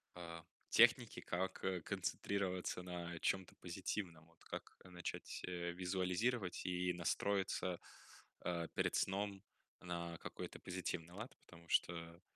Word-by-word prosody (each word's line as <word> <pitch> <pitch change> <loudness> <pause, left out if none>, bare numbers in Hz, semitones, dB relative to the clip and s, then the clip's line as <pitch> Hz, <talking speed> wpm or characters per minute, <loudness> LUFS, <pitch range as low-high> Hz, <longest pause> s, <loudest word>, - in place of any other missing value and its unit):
а, 85 -1 -6 0.2
техники, - - +7
как, 95 +2 -1
э, 95 -2 +1
концентрироваться 95 -1 0
на 85 -1 -4
чём-то 95 +1 +1
позитивном? 90 -2 -3
Вот 85 0 -23
как - - -6
начать, 90 -1 -4
э, 85 -1 -1
визуализировать 95 +4 +1
и 90 0 +2
настроиться, 90 0 +1 0.6
а, 85 -2 0
перед - - +2
сном 100 0 +1 0.4
на 85 -1 -3
какой-то - - -5
позитивный 90 -2 -2
лад, 110 +6 -6
потому 85 -1 -14
что, 85 0 +2
90 Hz, 115 wpm, -41 LUFS, 85-95 Hz, 0.6 s, техники